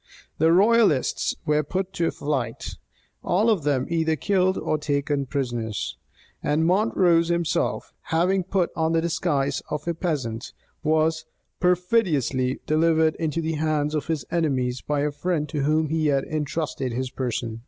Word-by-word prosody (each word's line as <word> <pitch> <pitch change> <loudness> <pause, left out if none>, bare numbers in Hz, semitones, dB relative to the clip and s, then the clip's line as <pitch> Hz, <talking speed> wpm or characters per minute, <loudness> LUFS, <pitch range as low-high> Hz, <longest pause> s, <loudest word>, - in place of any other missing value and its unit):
The 160 +1 +4
royalists 200 - +3
were 150 0 +2
put 190 +5 -3
to 165 -1 0
flight; 135 -6 -3 0.5
all 210 +6 +2
of 205 -6 +1
them 140 -3 +1
either 160 -1 +1
killed 190 +1 +1
or 155 - -1
taken 145 -1 -1
prisoners; 120 - -3 0.5
and 150 +2 +1
Montrose 180 -3 +3
himself, 170 -1 -1
having 180 +4 +1
put 185 -1 0
on 160 0 +1
the 165 - +3
disguise 145 -4 0
of 150 +2 -4
a 170 - +1
peasant, 140 -10 -3 0.3
was 155 0 +1 0.3
perfidiously 175 - +1
delivered 160 +1 +3
into 165 0 -1
the 160 0 -2
hands 155 -1 0
of 150 - -2
his 160 -5 -2
enemies 130 -7 0
by 145 -1 -1
a 150 +1 0
friend 150 +1 -1
to 145 -3 -1
whom 155 +1 +2
he 160 0 +1
had 140 -2 +2
intrusted 150 -4 -3
his 130 +1 -3
person. 120 -3 -3
155 Hz, 150 wpm, -24 LUFS, 140-170 Hz, 0.5 s, The